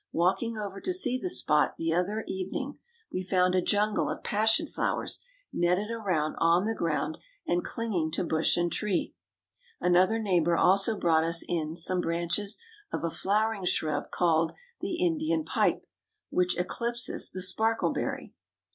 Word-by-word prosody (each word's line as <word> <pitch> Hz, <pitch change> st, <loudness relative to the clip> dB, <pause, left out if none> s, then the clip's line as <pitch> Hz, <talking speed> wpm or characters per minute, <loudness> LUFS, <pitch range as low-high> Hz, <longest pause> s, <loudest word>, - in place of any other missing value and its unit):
Walking 195 Hz, +7 st, +1 dB
over 200 Hz, -2 st, -5 dB
to 365 Hz, -, 0 dB
see 255 Hz, -8 st, 0 dB
the 365 Hz, -, -2 dB
spot 150 Hz, -, +2 dB
the 165 Hz, 0 st, 0 dB
other 200 Hz, +6 st, 0 dB
evening, 195 Hz, +9 st, -4 dB, 0.3 s
we 185 Hz, -, -1 dB
found 185 Hz, -1 st, +2 dB
a 185 Hz, -, +3 dB
jungle 210 Hz, +3 st, +1 dB
of -, -, -5 dB
passion 220 Hz, +1 st, +3 dB
flowers -, -, -2 dB, 0.3 s
netted 180 Hz, +5 st, +1 dB
around 185 Hz, -9 st, -1 dB
on 170 Hz, +3 st, +4 dB
the 225 Hz, -, 0 dB
ground, 170 Hz, -, -1 dB, 0.3 s
and 175 Hz, 0 st, 0 dB
clinging 200 Hz, -9 st, -2 dB
to -, -, 0 dB
bush 160 Hz, 0 st, +1 dB
and 175 Hz, 0 st, +1 dB
tree. 205 Hz, -4 st, -1 dB, 0.7 s
Another 185 Hz, +5 st, +4 dB
neighbor 175 Hz, -6 st, +2 dB
also 195 Hz, +3 st, +4 dB
brought 160 Hz, -3 st, +3 dB
us 165 Hz, 0 st, +1 dB
in 160 Hz, -2 st, -2 dB
some 180 Hz, +1 st, +1 dB
branches 175 Hz, +5 st, -1 dB, 0.3 s
of -, -, -3 dB
a 165 Hz, -, -1 dB
flowering 210 Hz, +2 st, 0 dB
shrub 155 Hz, -4 st, -1 dB
called 165 Hz, -2 st, +2 dB, 0.3 s
the -, -, -3 dB
Indian 325 Hz, -2 st, 0 dB
pipe, -, -, +1 dB, 0.5 s
which 180 Hz, 0 st, +1 dB
eclipses 235 Hz, +7 st, -1 dB
the 185 Hz, -, -3 dB
sparkleberry. 225 Hz, +4 st, 0 dB
185 Hz, 150 wpm, -28 LUFS, 170-220 Hz, 0.7 s, on